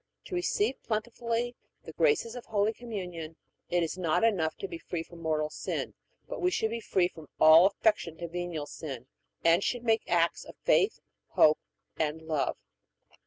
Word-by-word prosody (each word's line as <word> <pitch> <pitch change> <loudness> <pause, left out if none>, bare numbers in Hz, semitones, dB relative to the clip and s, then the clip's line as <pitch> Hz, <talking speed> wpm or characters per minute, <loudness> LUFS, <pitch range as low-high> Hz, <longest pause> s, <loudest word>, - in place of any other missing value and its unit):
To - - -9
receive 355 -2 0
plentifully 235 +2 -2 0.3
the - - -9
graces 440 - +2
of 245 - -7
Holy 210 0 +1
Communion 180 -9 -6 0.3
it 175 -1 +2
is 165 +3 -3
not 170 +3 +1
enough 185 -9 +2
to 395 - -4
be 340 -3 -7
free 175 - -4
from 170 0 -14
mortal 155 -1 0
sin, - - -3 0.3
but - - -5
we 360 - +3
should 220 -11 0
be 230 - -2
free 185 -4 +2
from 160 -4 -13
all 160 +4 +9
affection 200 -5 0
to 170 - -5
venial 175 -3 -4
sin, 135 -5 -7 0.4
and 170 +3 +5
should 245 -1 -1
make 225 -2 +3
acts 170 -1 +2
of - - -12
faith, 405 - +3 0.3
hope, 155 0 +6 0.4
and 155 +1 -1
love. 155 -3 -1
180 Hz, 170 wpm, -29 LUFS, 160-230 Hz, 0.4 s, all